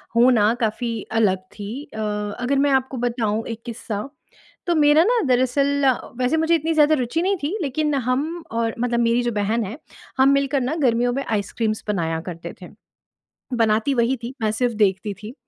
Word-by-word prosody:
होना 230 -3 +5
काफ़ी 230 +2 -1 0.3
अलग 195 -4 +3 0.2
थी 215 +7 -6
अ, 220 - -6 0.4
अगर 255 +3 0
मैं 285 0 +3
आपको 265 -1 0
बताऊँ 230 -3 -1
एक 230 -1 -6
किस्सा। 220 -1 -5 0.6
तो 345 - +2
मेरा 300 +1 +5
ना 470 +4 +2
दरअसल, 275 +3 +2 0.3
वैसे 255 +6 +1
मुझे 320 +1 +3
इतनी 325 +1 0
ज़्यादा 310 0 +5
रुचि 260 +4 -1
नहीं 385 +2 +1
थी, 330 +9 -1
लेकिन 300 +1 -1
हम 280 +7 -1
और 230 -1 -1
मतलब 240 0 0
मेरी 235 +1 +2
जो 240 - 0
बहन 215 +2 0
है, 215 +7 -7 0.4
हम 265 +1 +5
मिलकर 275 0 +1
ना 255 +5 -1
गर्मियों 245 0 +2
में 275 +2 -2
आइसक्रीम्स 215 +1 -2
बनाया 165 -5 -1
करते 170 0 -7
थे, 180 - -9 0.9
बनाती 225 +2 +2
वही 245 +1 +2
थी 245 +3 -5
मैं 215 -1 +1
सिर्फ़ 240 +2 0
देखती 205 -1 +1
थी। 220 +4 -7
245 Hz, 180 wpm, -22 LUFS, 220-280 Hz, 0.9 s, होना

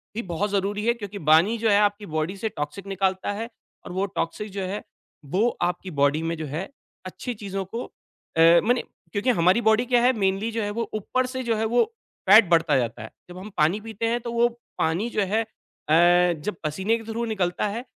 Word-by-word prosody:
भी 230 - -1
बहुत 200 +5 -1
ज़रूरी 205 +2 -1
है 235 - +4
क्योंकि 205 -3 -7
पानी 180 +9 +5
जो 225 0 +1
है 200 - +5
आपकी 205 0 +1
बॉडी 155 +5 -1
से 220 +2 -2
टॉक्सिक 150 +5 -6
निकालता 190 0 -1
है, 225 +3 -5 0.4
और - - -7
वो 190 +2 0
टॉक्सिक 205 +5 -3
जो 195 0 -4
है, 190 +3 -4 0.4
वो 190 +11 +1
आपकी 180 +1 -2
बॉडी 145 +3 +3
में 165 0 -1
जो 160 - -4
है 160 - -5 0.4
अच्छी 245 +6 -5
चीज़ों 195 -2 -5
को 240 - -2 0.5
अ 165 +1 +7
मने 245 +2 +2 0.3
क्योंकि 210 +5 0
हमारी 185 +2 +3
बॉडी 220 +2 +3
क्या 245 -1 +3
है, 250 +2 +5
मेनली 200 0 0
जो 225 -1 -2
है, 205 - -2
वो 230 0 -3
ऊपर 255 +5 -1
से 260 0 -4
जो 230 -2 0
है 220 - 0
वो 240 +2 +3 0.5
फैट 210 -3 +8
बढ़ता 165 -4 +4
जाता 120 -4 -2
है। 110 - -8 0.2
जब 175 - -10
हम 200 +3 -8
पानी 160 +7 +3
पीते 225 0 -5
हैं, 240 +1 0
तो 235 0 -5
वो 235 0 +3 0.3
पानी 175 +9 0
जो 210 - -1
है 215 +4 +1
अ, 175 -2 +2
जब 210 +1 -3
पसीने 190 +9 0
के 225 - -10
थ्रू 235 +1 -2
निकलता 195 -3 -1
है, 230 +5 -4
200 Hz, 215 wpm, -24 LUFS, 175-225 Hz, 0.5 s, फैट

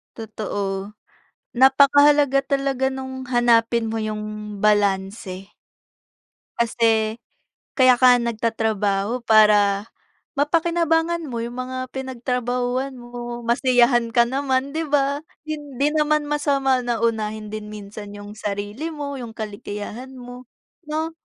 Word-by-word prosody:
Totoo. 205 -2 -4 0.6
Napaka-halaga 280 +2 +5
talaga 275 -1 0
nung 260 -1 -6
hanapin 235 -2 +2
mo 225 - -2
yung 215 -1 -5
balanse. 195 -2 0 1.1
Kasi, 225 -1 +1 0.6
kaya 255 -2 +5
ka 250 -1 +7
nga 240 - -1
nagtatrabaho 220 -1 -1
para 210 -1 +4 0.5
mapakinabangan 330 +1 +1
mo 235 -2 -4
yung 240 +2 -6
mga 255 0 -5
pinagtrabahuhan 250 0 -2
mo, 240 0 -7
masiyahan 240 0 +3
ka 235 - +7
naman, 265 +1 -1
di 320 +1 -3
ba? 280 0 +1 0.2
Hindi 295 -2 -2
naman 305 -1 +2
masama 275 -3 +2
na 240 -2 -2
unahin 215 -2 -2
din 215 -1 -6
minsan 205 0 -9
yung 205 0 -9
sarili 205 +8 -4
mo, 285 -4 -5
yung 230 -2 -8
kaligayahan 215 +4 -7
mo, 245 0 -11 0.4
no? 315 +2 -2
245 Hz, 110 wpm, -22 LUFS, 215-275 Hz, 1.1 s, ka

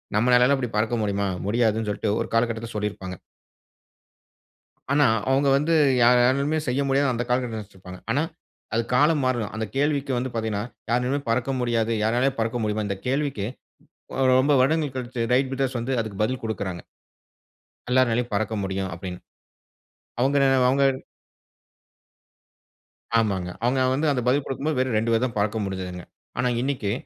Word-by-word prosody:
நம்மளாலைலாம் 125 +4 +4
இப்படி 125 -3 -3
பறக்க 110 +2 +1
முடியுமா? 100 -1 0 0.2
முடியாதுன்னு 110 -1 +1
சொல்லிட்டு 105 +1 -2
ஒரு - - -3
காலகட்டத்தில 115 0 0
சொல்லியிருப்பாங்க. 100 -3 -4 1.8
ஆனா, 145 +1 +4 0.3
அவங்க 140 +1 +3
வந்து 160 +4 +1 0.3
யார் 125 +1 +6
யாராலும் 140 +5 +2
செய்ய 130 +3 +1
முடியாது 135 -1 +2
அந்த 120 +1 -2
காலகட்ட 125 -2 0
நினைச்சிருப்பாங்க. 95 -3 -11
ஆனா, 140 +6 +2 0.5
அது 115 - +2
காலம் 150 +3 +4
மாறும். 120 -5 -1
அந்த 110 0 -2
கேள்விக்கு 140 -1 0
வந்து 130 +1 -3
பார்த்தீங்கனா 110 -2 -2 0.3
யாராலுமே 125 +4 +1
பறக்க 120 +3 0
முடியாது 115 -2 0
யாராலயும் 125 +4 +1
பறக்க 115 +2 -1
முடியுமா? 105 0 -1
இந்த 100 - -2
கேள்விக்கு 135 -6 -1 0.9
ரொம்ப 145 +3 +3
வருடங்கள் 150 0 +1
கழிச்சு 125 -1 -4
ரைட் 130 +1 +2
விட்டர்ஸ் 135 -2 -1
வந்து 120 +3 -3
அதுக்கு 110 -3 -4
பதில் 130 +3 -1
குடுக்கறாங்க. 95 -6 -3 1.1
எல்லாராலையும் 125 -1 +2
பறக்க 110 +1 -1
முடியும் 95 -1 -3
அப்டின்னு. 90 -2 -7 1.0
அவங்க- 135 +3 +3 0.3
அவங்க. 140 +2 +2 2.4
ஆமாங்க. 95 -5 0
அவங்க 130 +2 +2
வந்து 150 +4 0
அந்த 125 - 0
பதில் 135 +2 +2
குடுக்கும்போது 140 +2 -2
வெறும் 130 -3 +1
2 115 +2 0
பேர் 115 +2 +2
தான் 115 -3 -7
பறக்க 105 +2 0
முடுஞ்ச்சுதுங்க. 90 -2 -5 0.3
ஆனா, 125 - +1
இன்னைக்கு 130 -7 -1
120 Hz, 140 wpm, -24 LUFS, 110-135 Hz, 2.4 s, யார்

